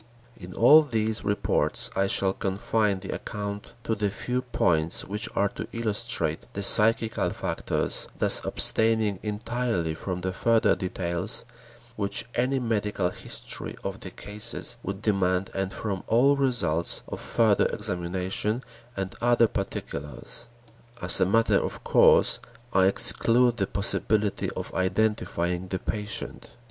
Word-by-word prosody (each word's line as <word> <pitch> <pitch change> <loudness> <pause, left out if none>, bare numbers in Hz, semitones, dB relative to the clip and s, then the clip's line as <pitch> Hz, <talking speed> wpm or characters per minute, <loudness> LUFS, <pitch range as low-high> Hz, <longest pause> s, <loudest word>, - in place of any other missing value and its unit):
In 90 -1 -11
all 145 +7 +7
these 110 -6 -1
reports, 100 -1 +3
I 95 - +2
shall 95 0 +1
confine 100 +1 -1
the 95 - -5
account 100 -1 -6
to 115 - -1
the 105 -2 0
few 125 +5 -3
points 85 -10 0
which 105 +2 -2
are 100 +1 +2
to - - -7
illustrate 110 -3 -1
the 100 - -3
psychical 115 +2 +2
factors, - - -2
thus - - +4
abstaining 110 -3 +4
entirely 105 -5 -2
from 90 +2 -5
the 95 +1 -2
further 115 +3 +3
details 90 +2 -3 0.5
which 100 +1 -1
any 125 +3 +1
medical 105 -6 -1
history - - -6
of - - -4
the - - -8
cases 110 +3 -3
would 100 0 -6
demand 95 -3 +1
and 95 -1 -2
from 100 -2 -4
all 135 +5 +4
results 120 - +1
of - - -6
further 110 -3 +3
examination 95 +6 -2 0.3
and 95 -1 -3
other 120 -1 +4
particulars. 75 - -5 0.5
As 90 -4 +2
a - - +4
matter 115 +4 +3
of - - -4
course, - - +4 0.3
I 95 0 +4
exclude 120 +4 +2
the 100 -3 0
possibility 105 +1 -1
of - - -4
identifying 95 -3 -1
the 95 - -2
patient. 105 +3 -5
105 Hz, 135 wpm, -26 LUFS, 95-115 Hz, 0.5 s, all